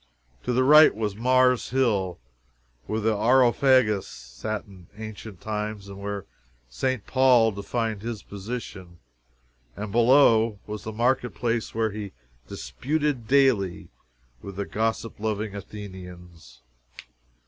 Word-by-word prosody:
To 125 - 0
the 125 +1 +2
right 150 +3 +7
was 105 -2 -2
Mars 125 +2 +3
Hill, 105 -9 0 0.7
where 110 - -1
the 110 0 +1
Areopagus 120 -1 +3
sat - - -6
in 95 -5 -16
ancient 110 -3 -9
times 105 -1 -4
and 100 0 -9
where 100 -1 -4 0.5
St. 130 - -2
Paul 125 -4 +4
defined 110 +1 -3
his 115 -1 -5
position, 100 -4 -7 0.8
and 105 -1 -5
below 115 -2 +4
was 105 0 -7
the 110 - -4
market 120 -1 0
place 115 0 -2
where 110 -1 0
he 100 -2 -7 0.3
"disputed 145 - -2
daily" 125 -10 +2 0.5
with 100 -1 -9
the 100 +1 -3
gossip 115 +1 -2
loving 105 -1 -2
Athenians. 90 - -10
110 Hz, 120 wpm, -25 LUFS, 100-120 Hz, 0.8 s, right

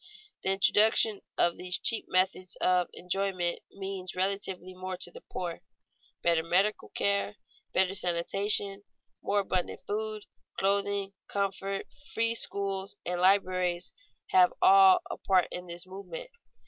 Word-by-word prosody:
The - - +1
introduction 210 +2 +3 0.2
of 170 - +3
these 180 0 +3
cheap 225 - +3
methods 185 0 0
of 180 -1 +2
enjoyment 180 -1 -2
means 190 -2 -6
relatively 185 -1 -2
more 185 0 -6
to - - -2
the - - -12
poor. - - -6 0.6
Better 170 -1 +3
medical 190 +6 +1
care, 200 +1 0 0.4
better 190 0 +2
sanitation, 195 +3 +2 0.4
more 205 0 +1
abundant 185 -2 -3
food, 215 0 -4 0.3
clothing, 200 0 0
comfort, 195 0 -2 0.3
free 230 0 +1
schools, 195 -3 -3
and 180 0 -2
libraries 185 -2 +1 0.4
have 370 -2 +6
all 375 -1 +7
a - - -6
part 185 -2 +2
in 180 0 -7
this 175 +1 -6
movement. 350 - -9
195 Hz, 125 wpm, -29 LUFS, 185-205 Hz, 0.6 s, all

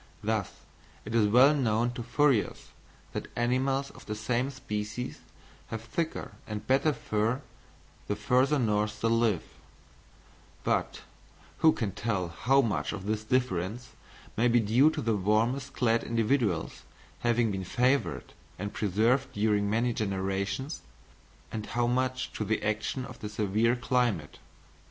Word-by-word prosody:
Thus, 110 -2 0 0.6
it - - -6
is 110 -3 +4
well 125 +7 +6
known 120 -4 +1
to 120 - -6
furriers 125 -1 +1 0.4
that - - -4
animals 130 +3 0
of - - -15
the 105 - -3
same 120 +4 0
species 115 -2 -5 0.5
have 115 -1 -5
thicker 160 +7 -3 0.2
and 105 -1 -5
better 135 +4 +3
fur 115 +1 -1 0.6
the 105 - 0
further 130 +8 +2
north 105 -3 0
they 115 - +2
live; 115 -5 +2 1.2
but - - 0 0.6
who 160 -1 +6
can 110 -9 -2
tell 95 -4 -2
how 135 +10 +3
much 105 -6 -1
of 95 -2 -6
this 110 +1 -1
difference 120 -1 -1 0.5
may 120 +3 +3
be 120 0 +4
due 115 +7 +4
to - - -3
the 115 -1 +1
warmest 115 +7 +1
clad 115 -2 +2
individuals 115 - 0 0.4
having 120 -2 +2
been 95 -1 -3
favoured 125 +9 0 0.2
and 105 +1 -4
preserved 110 +6 +1
during 105 -1 +1
many 115 +3 +1
generations, 100 +6 -2 0.7
and 110 -1 -4
how 120 - +3
much 130 +1 -1
to - - -2
the 110 +1 -1
action 110 +5 -1
of 125 -1 -11
the 105 - -5
severe 105 +3 +1
climate? 120 - 0
115 Hz, 140 wpm, -29 LUFS, 105-125 Hz, 1.2 s, well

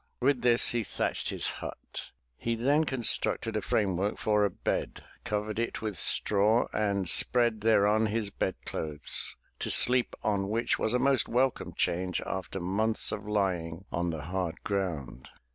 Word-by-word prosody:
With 130 0 +2
this 120 -1 +5
he 120 -1 -1
thatched 90 - -2
his - - +1 0.2
hut. - - -7 0.3
He 115 - -2
then 140 +7 +2
constructed 125 -6 -1
a - - 0
frame 95 -5 0
work 100 +3 -1
for 105 -1 +2
a 100 - +3
bed, - - -3 0.2
covered 105 +1 -2
it 115 -1 -3
with 105 -6 -4
straw 105 +3 +3
and 100 -3 0
spread 120 +5 +3
thereon 110 0 +3
his 105 -1 -2
bed 95 - -2
clothes, 75 -2 -2 0.2
to - - -3
sleep 125 0 +4
on 100 -2 0
which 115 +3 0
was 110 - +1
a - - +4
most 135 +1 +2
welcome 125 +2 0
change 90 +1 -1
after 95 0 -4
months 105 +5 +1
of 105 0 -5
lying 95 -4 -1
on 85 0 -1
the 80 -3 -4
hard 90 0 -4
ground. 75 -11 -3
105 Hz, 160 wpm, -29 LUFS, 95-115 Hz, 0.3 s, this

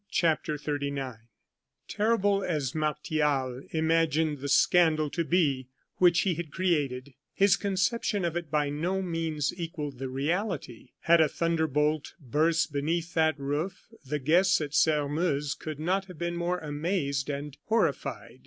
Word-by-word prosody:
CHAPTER 155 -2 +1
XXXIX 140 -4 -3 0.7
Terrible 205 -2 +1
as 145 -6 -1
Martial 150 -4 -1
imagined 160 -2 +1
the 140 +1 -4
scandal 155 0 +4
to 170 - -1
be 150 -7 +1 0.3
which 175 -2 +5
he 190 - +1
had 165 -2 -6
created, 145 -8 -1 0.2
his 195 -1 +5
conception 200 0 0
of 170 -1 -2
it 170 -3 -3
by 145 -1 +1
no 180 +6 -1
means 165 -5 -1
equalled 150 -6 -5
the 135 -1 -4
reality. 145 - -3
Had 170 0 +5
a 155 - +4
thunder 165 0 0
bolt 150 +1 0
burst 155 +4 +1
beneath 165 +4 -1
that 160 -3 +2
roof, 155 +10 -4
the 150 +2 -2
guests 170 +7 +3
at 150 -2 -4
Sairmeuse 150 -1 +1
could 155 -2 -7
not 185 +5 0
have 180 -3 -12
been 170 +1 -2
more 175 +1 -1
amazed 150 -3 -2
and 145 0 -4
horrified. 225 +1 -1
155 Hz, 145 wpm, -28 LUFS, 145-175 Hz, 0.7 s, which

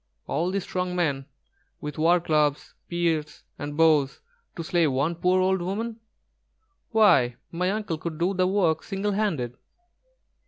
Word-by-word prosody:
all 165 +5 -1
these 195 0 -1
strong 180 -1 -3
men 140 -6 -1 0.5
with 150 -1 -6
warclubs, 155 -3 +2
spears, 165 -3 -1 0.2
and 145 0 -5
bows, 155 -4 +3 0.4
to 165 - -4
slay 170 0 +2
one 140 +4 0
poor 180 +2 +2
old 190 0 +2
woman! 220 +6 -3 0.9
Why, 175 - +4 0.2
my 180 +2 0
uncle 205 -6 -2
could 160 -1 -5
do 175 +4 +1
the 185 -1 +2
work 180 -5 +2
single 195 +1 -2
handed." 165 - -1
170 Hz, 135 wpm, -26 LUFS, 150-185 Hz, 0.9 s, Why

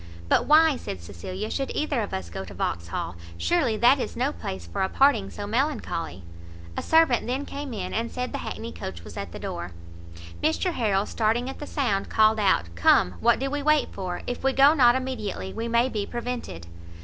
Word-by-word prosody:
"But - - +3
why," 310 -1 +6
said 95 - -6
Cecilia, 140 - -6
"should 270 -1 -2
either 295 -5 0
of 205 - -4
us 90 -3 -5
go 95 - -5
to 95 - -10
Vauxhall? 85 +1 -3 0.2
surely 275 -11 +1
that 245 +5 +5
is - - -4
no 260 +4 +1
place 95 -2 -6
for 85 - -4
a 190 - +1
parting 255 -8 +3
so 205 - -6
melancholy." 220 - -2 0.5
A - - -2
servant 320 -8 +3
then 265 +3 -2
came 285 -1 -6
in, 190 -5 -4
and 230 +1 -1
said 250 0 -4
the - - -3
hackney 230 +1 -5
coach 85 -2 -7
was - - -10
at - - -5
the - - -7
door. 85 +1 -5 0.7
Mr 345 - +1
Harrel, 205 -6 +1
starting 230 +4 0
at - - -12
the 295 - -6
sound, 225 -9 -1
called 220 0 +4
out, 85 - +1
"come, 85 +1 +4
what - - +4
do 270 +1 -2
we 290 0 -1
wait 305 0 +3
for? 185 -2 -4
if 245 +1 -4
we 270 0 +2
go 275 +3 +6
not 245 -5 +5
immediately, 235 -7 -3
we 230 +1 -3
may 235 +2 +3
be 210 -5 -3
prevented." 240 - -5
230 Hz, 205 wpm, -26 LUFS, 185-270 Hz, 0.7 s, why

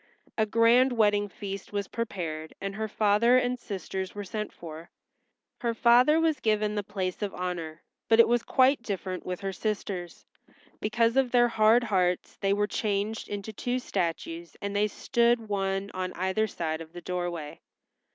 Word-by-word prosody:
A 220 -1 +1
grand 235 +4 +4
wedding 205 -2 +2
feast 195 0 -7
was 200 -2 -2
prepared, 165 -9 -4
and 195 0 -4
her 220 +2 -3
father 215 +4 +4
and 250 0 0
sisters 190 -2 -5
were 205 - -4
sent 210 +2 -4
for. 165 0 -10 0.7
Her 235 -2 -1
father 245 +7 +5
was 320 -3 +2
given 215 -2 +1
the 210 - -1
place 190 -2 -4
of 205 -2 -3
honor, 170 -3 -4 0.3
but 225 0 +5
it 230 - +8
was 240 0 +2
quite 260 +2 +3
different 190 -4 -4
with 180 -1 -4
her 195 -1 -3
sisters; 190 -4 -4 0.5
because 230 +3 +1
of 265 -2 +3
their 240 -1 +4
hard 225 +2 +4
hearts 180 -5 0
they 195 - 0
were 205 +1 +2
changed 210 +1 -2
into 205 +1 -5
two 245 +4 -2
statues 170 -6 -3
and 200 0 -4
they 210 +1 +3
stood 235 +1 +1
one 195 -1 -1
on 185 0 -3
either 190 +4 0
side 160 -5 -3
of 160 0 -11
the 175 - -8
doorway. 175 -4 -4
205 Hz, 170 wpm, -28 LUFS, 185-230 Hz, 0.7 s, it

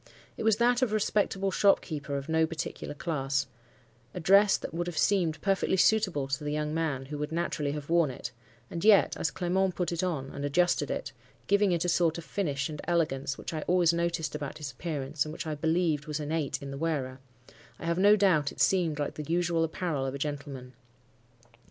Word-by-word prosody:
It - - -7
was 220 -1 +4
that 240 +1 +3
of 255 - +3
a - - -5
respectable 195 -2 0
shopkeeper 155 -8 +1
of 140 - -6
no 160 0 +2
particular 155 -2 -5
class; 140 -4 -1 0.7
a - - -3
dress 195 +4 +5
that - - -7
would 175 +1 -2
have 175 -3 -5
seemed 170 -7 +2
perfectly 195 -1 +1
suitable 185 -9 +2
to 140 +2 -3
the 145 - -2
young 150 0 -2
man 155 -5 -1
who 145 +2 -6
would 150 +1 -3
naturally 160 -3 -1
have 150 -1 -6
worn 170 -3 +3
it; 125 - -6 0.4
and 170 - -4
yet, 210 -2 +5
as 160 - 0
Clement 185 +3 0
put 180 -1 -1
it 170 - -1
on, 155 -8 -2
and 140 - -6
adjusted 175 +5 +2
it—giving 200 -1 -1
it 170 0 0
a - - +1
sort 170 -1 +2
of 170 - -6
finish 145 -9 -2
and 150 -1 -7
elegance 145 -6 0
which - - -6
I 155 - -3
always 175 -2 +4
noticed 170 -3 -1
about 145 -2 -5
his 145 -3 -6
appearance 140 0 -3
and 155 - -7
which 170 +2 -6
I 155 - -2
believed 160 0 0
was 150 0 -3
innate 150 -1 -2
in 140 - -6
the 140 - -6
wearer—I 130 -3 -6
have 170 +1 0
no 205 +2 +7
doubt 180 -8 +3
it - - -13
seemed 170 -5 +2
like 145 -1 -2
the 150 +1 -6
usual 170 -1 +1
apparel 160 -4 -2
of 135 - -4
a - - -3
gentleman. 140 -3 -5
160 Hz, 205 wpm, -29 LUFS, 145-175 Hz, 0.7 s, no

